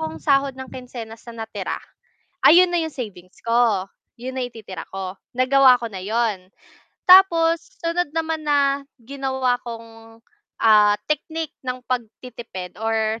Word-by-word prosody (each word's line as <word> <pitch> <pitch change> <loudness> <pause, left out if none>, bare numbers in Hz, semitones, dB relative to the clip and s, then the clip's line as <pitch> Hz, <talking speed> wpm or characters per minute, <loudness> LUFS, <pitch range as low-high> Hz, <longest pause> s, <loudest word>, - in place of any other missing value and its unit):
akong 160 0 -4
sahod 275 -1 +2
ng 260 0 -8
kinsenas 230 -3 -9
na 230 -1 -7
natira, - - -4 0.7
ayun 360 +3 +8
na 345 - +1
'yong 320 - -5
savings 190 -7 -8
ko. 230 -5 +2 0.3
'Yon 260 +2 -6
na 260 - -1
yung 245 - -5
ititira 210 -5 -8
ko, 190 0 -5 0.2
nagawa 255 0 +5
ko 235 - -4
na 190 - -6
'yon. 210 -4 -1 0.6
Tapos 335 -3 +6 0.2
sunod 335 -1 -1
naman 320 -1 -1
na 280 -1 +2 0.2
ginawa 265 -1 -1
kong, 225 -1 -11 0.4
ah, 210 -2 +6
technique 320 0 -3
ng 250 0 -2
pagtitipid 235 -6 -6
or 225 0 0
245 Hz, 140 wpm, -22 LUFS, 220-275 Hz, 0.7 s, ayun